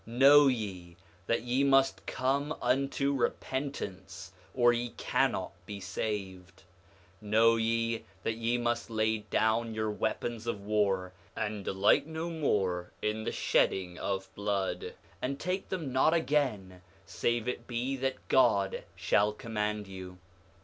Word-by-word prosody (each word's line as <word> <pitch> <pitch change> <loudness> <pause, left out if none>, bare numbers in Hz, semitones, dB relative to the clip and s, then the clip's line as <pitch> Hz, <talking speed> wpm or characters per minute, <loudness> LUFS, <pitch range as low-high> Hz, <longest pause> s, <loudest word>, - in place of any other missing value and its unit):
7:3 115 +1 -8
Know 140 +2 +8
ye 95 -9 -3 0.3
that 115 - +1
ye 125 +3 +1
must 135 -1 +3
come 140 +4 0
unto 140 +1 +1
repentance, 130 - -3 0.2
or 120 -1 +4
ye 120 0 -3
cannot - - 0 0.2
be 100 -1 -6
saved. 95 -2 -5 0.6
7:4 105 - -9
Know 115 +2 +5
ye 115 0 0 0.2
that 115 - 0
ye 115 +2 0
must 120 -1 -1
lay 110 0 +1
down 110 +2 0
your 110 -1 -1
weapons 110 +2 -3
of 110 -3 -2
war, 100 -3 +1 0.2
and 105 -2 -3
delight 100 +11 +3
no 160 +1 -4
more 95 - 0
in 110 +1 -1
the - - -1
shedding 90 -2 +1
of 95 -1 -3
blood, 100 -2 -2 0.3
and 140 +2 -2
take 185 +2 -2
them 160 -9 -3
not 155 +5 +4
again, 125 - 0 0.2
save 120 0 -1
it 120 -1 -4
be 125 +3 -2
that 135 0 -3
God 100 -7 +3
shall 105 +2 +2
command 105 -1 -3
you. 95 -1 -9
115 Hz, 140 wpm, -30 LUFS, 100-130 Hz, 0.6 s, Know